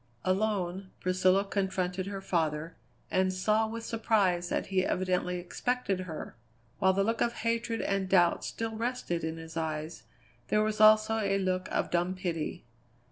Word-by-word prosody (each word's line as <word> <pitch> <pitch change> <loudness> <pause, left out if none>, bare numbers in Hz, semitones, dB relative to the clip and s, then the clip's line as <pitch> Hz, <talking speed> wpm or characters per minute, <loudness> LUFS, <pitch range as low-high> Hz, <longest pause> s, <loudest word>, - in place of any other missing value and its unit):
Alone, 190 -1 0
Priscilla 185 +2 +3
confronted 190 -2 -1
her 200 -1 -5
father, 165 -3 -1 0.4
and 185 0 +2
saw 215 +4 +2
with 230 +1 -6
surprise 200 -6 +1
that - - -1
he 185 -1 +3
evidently 180 -1 0
expected 200 +3 -2
her. 170 -4 -6 0.4
While 190 0 +4
the 195 +1 +2
look 225 +2 -1
of 235 - +2
hatred 230 0 0
and 195 -1 -1
doubt 175 -3 +4
still 225 -1 -4
rested 230 -7 -2
in 160 0 -3
his 165 0 -9
eyes, 155 0 -3 0.5
there 210 +10 +3
was 215 0 -1
also 215 +1 +6
a 195 -2 +1
look 185 -1 -1
of - - -1
dumb 175 +2 +1
pity. 170 - -3
185 Hz, 155 wpm, -30 LUFS, 175-215 Hz, 0.5 s, also